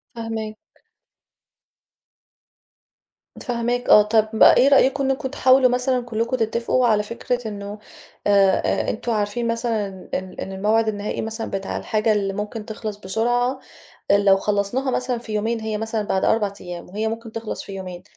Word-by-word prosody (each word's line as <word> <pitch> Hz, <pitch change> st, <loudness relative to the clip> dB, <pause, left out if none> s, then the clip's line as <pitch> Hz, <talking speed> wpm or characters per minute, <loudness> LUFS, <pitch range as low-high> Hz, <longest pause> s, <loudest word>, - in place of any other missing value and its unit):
فاهماك. 225 Hz, -2 st, -4 dB, 2.9 s
فاهماك 245 Hz, 0 st, -2 dB
آه، 210 Hz, -, +9 dB
طَب 220 Hz, +1 st, +2 dB
إيه 260 Hz, -, +7 dB
رأيكم 275 Hz, 0 st, +4 dB
إنكم 270 Hz, 0 st, -1 dB
تحاولوا 260 Hz, -1 st, +4 dB
مثلًا 250 Hz, +1 st, +1 dB
كلكم 235 Hz, +2 st, -1 dB
تتفقوا 235 Hz, +2 st, +1 dB
على 210 Hz, -2 st, +3 dB
فكرة 235 Hz, +2 st, -3 dB
إنه 205 Hz, 0 st, -6 dB, 0.5 s
آآ 200 Hz, -2 st, +4 dB
آآ -, -, 0 dB
أنتم 235 Hz, +2 st, -3 dB
عارفين 215 Hz, +2 st, -1 dB
مثلًا 230 Hz, -3 st, -1 dB, 0.3 s
إن 185 Hz, 0 st, -4 dB
إن 195 Hz, -, -5 dB
الموعد 215 Hz, +4 st, +1 dB
النهائي 205 Hz, -1 st, -2 dB
مثلًا 225 Hz, +1 st, -4 dB
بتاع 195 Hz, 0 st, -3 dB
الحاجة 215 Hz, +1 st, 0 dB
اللي 200 Hz, -2 st, -1 dB
ممكن 210 Hz, +1 st, -5 dB
تخلص 215 Hz, -2 st, -6 dB
بسرعة، 240 Hz, +6 st, 0 dB, 0.5 s
لو 200 Hz, -1 st, +5 dB
خلصناها 210 Hz, +7 st, -1 dB
مثلًا 250 Hz, -1 st, -1 dB
في 230 Hz, -2 st, -8 dB
يومين 225 Hz, +2 st, -1 dB
هي 220 Hz, -1 st, -3 dB
مثلًا 220 Hz, 0 st, -2 dB
بعد 190 Hz, -2 st, -1 dB
4 210 Hz, -3 st, +2 dB
أيام 175 Hz, -1 st, -8 dB
وهي 215 Hz, +4 st, -2 dB
ممكن 225 Hz, 0 st, -6 dB
تخلص 225 Hz, -1 st, -5 dB
في -, -, -10 dB
يومين، 185 Hz, -2 st, -7 dB
220 Hz, 150 wpm, -22 LUFS, 205-240 Hz, 2.9 s, آه